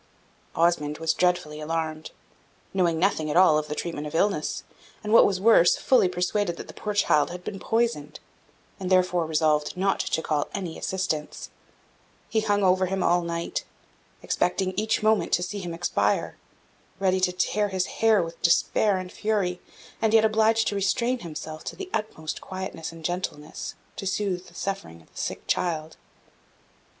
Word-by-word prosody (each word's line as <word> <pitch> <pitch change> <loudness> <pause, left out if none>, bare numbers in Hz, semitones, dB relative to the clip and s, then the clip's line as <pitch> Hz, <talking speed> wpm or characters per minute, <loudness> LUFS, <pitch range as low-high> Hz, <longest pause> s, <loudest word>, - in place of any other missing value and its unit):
Osmond 155 -3 +1
was 160 0 +1
dreadfully 175 -4 0
alarmed, 155 0 -3 0.6
knowing 175 -4 +2
nothing 160 -3 +1
at 150 - +1
all 170 -5 +6
of 150 - -5
the 150 - -4
treatment 150 -3 -4
of 150 - -7
illness, 170 -3 0 0.4
and, 210 +1 -1
what - - +8
was 195 -2 -1
worse, 195 -4 +6
fully 250 -8 +3
persuaded 180 0 -1
that - - -8
the - - -10
poor 210 -1 -4
child 150 -7 +3
had 180 0 -8
been 195 0 -6
poisoned, 225 -12 -1 0.6
and 185 -1 -3
therefore 180 -3 +3
resolved 155 +1 +1
not 195 +1 +1
to 160 - 0
call 150 -2 0
any 180 -4 -4
assistance; 170 -5 -3 0.8
he 225 - +1
hung 205 -2 +1
over 185 0 +3
him 190 0 -1
all 175 0 +3
night, 170 0 -3 0.6
expecting 185 +1 0
each 215 +1 0
moment 215 -1 +2
to 175 - +3
see 205 +3 -4
him 175 -3 -5
expire 165 +1 0 0.6
ready 190 -1 +2
to 185 -1 +2
tear 200 +3 0
his 185 -1 0 0.2
hair 220 -4 +5
with 165 0 -8
despair 190 +4 +3
and 185 -1 -6
fury, 200 -4 -1 0.4
and 220 0 +3
yet 220 0 +6
obliged 220 +1 +3
to - - 0
restrain 235 +6 0
himself 155 -3 -7
to - - -6
the 385 -1 -8
utmost 160 -7 -3
quietness 185 -4 -6
and 165 -1 -11
gentleness, 175 -4 -4 0.2
to 195 - -5
soothe 190 -2 -2
the 170 - -17
suffering 195 - -4
of - - -28
the - - -19
sick - - -4
child. 160 -3 -1
180 Hz, 170 wpm, -26 LUFS, 160-205 Hz, 0.8 s, what